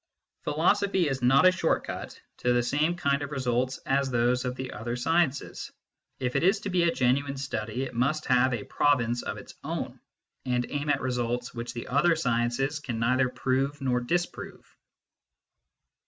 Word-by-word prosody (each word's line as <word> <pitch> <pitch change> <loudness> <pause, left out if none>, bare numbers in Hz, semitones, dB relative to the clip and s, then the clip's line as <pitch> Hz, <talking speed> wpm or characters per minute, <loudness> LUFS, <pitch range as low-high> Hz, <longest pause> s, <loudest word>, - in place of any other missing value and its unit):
Philosophy 185 +4 +2
is 135 -2 -2
not 135 +7 +5
a 185 - +8
short 175 -3 0
cut - - -7 0.2
to 125 - +1
the 120 0 +2
same 150 +7 +1
kind 140 -5 0
of 145 - -4
results 130 -2 -1
as 135 0 +1
those 125 +1 +1
of 125 0 -2
the 130 0 -5
other 120 +2 -4
sciences: 145 +2 0 0.5
if 125 -1 -2
it - - +3
is 195 +4 +3
to 205 - -4
be 180 -1 +2
a 170 0 +3
genuine 140 +1 +1
study, 120 -2 -3
it 135 - -5
must 140 +6 0
have 130 0 +3
a 120 -4 -2
province 120 -5 +1
of - - -4
its - - -11
own, - - -4 0.4
and 125 -1 0
aim 145 +1 -2
at 145 - +2
results 125 -1 -2
which 120 0 -5
the 120 - -5
other 155 +6 +3
sciences 125 +1 0
can 125 -6 -4
neither 125 +3 +2
Drove 135 +3 -1
nor 130 -3 +1
disprove. 175 +8 -4
130 Hz, 175 wpm, -28 LUFS, 125-145 Hz, 0.5 s, a